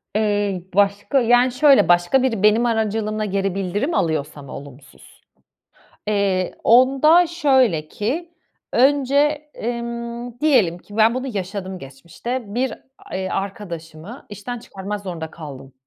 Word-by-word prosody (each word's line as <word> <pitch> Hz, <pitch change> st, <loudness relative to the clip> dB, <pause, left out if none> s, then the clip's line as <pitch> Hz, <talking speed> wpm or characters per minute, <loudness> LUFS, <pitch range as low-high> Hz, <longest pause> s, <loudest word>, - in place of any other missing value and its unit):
Iıı, 205 Hz, -3 st, 0 dB
başka 205 Hz, +6 st, +2 dB
Yani, 245 Hz, +2 st, +4 dB
şöyle, 275 Hz, +2 st, +5 dB
başka 175 Hz, +9 st, +3 dB
biri 225 Hz, -6 st, -1 dB
benim 215 Hz, +3 st, +4 dB
aracılığımla 215 Hz, -1 st, -1 dB
geri 195 Hz, -1 st, -1 dB
bildirim 195 Hz, -, -2 dB
alıyorsa 150 Hz, -3 st, -1 dB
mı, 135 Hz, -, -11 dB
olumsuz? 140 Hz, 0 st, -13 dB, 0.9 s
Iıı, 195 Hz, -3 st, 0 dB
onda 275 Hz, +8 st, +5 dB
şöyle 265 Hz, -, +2 dB
ki, 310 Hz, -, -3 dB, 0.4 s
önce, 285 Hz, +3 st, +2 dB
emm, 235 Hz, +1 st, -5 dB
diyelim 220 Hz, -, +3 dB
ki, 205 Hz, +3 st, -13 dB
ben 225 Hz, +1 st, +4 dB
bunu 260 Hz, +1 st, -3 dB
yaşadım 190 Hz, -4 st, -5 dB
geçmişte. 180 Hz, -, -7 dB
Bir 250 Hz, 0 st, 0 dB, 0.3 s
a -, -, -11 dB, 0.2 s
arkadaşımı 190 Hz, -, -6 dB
işten 210 Hz, +4 st, -6 dB
çıkarmak 205 Hz, -2 st, -6 dB
zorunda 170 Hz, -5 st, -6 dB
kaldım. 140 Hz, -5 st, -10 dB
215 Hz, 120 wpm, -21 LUFS, 185-250 Hz, 0.9 s, şöyle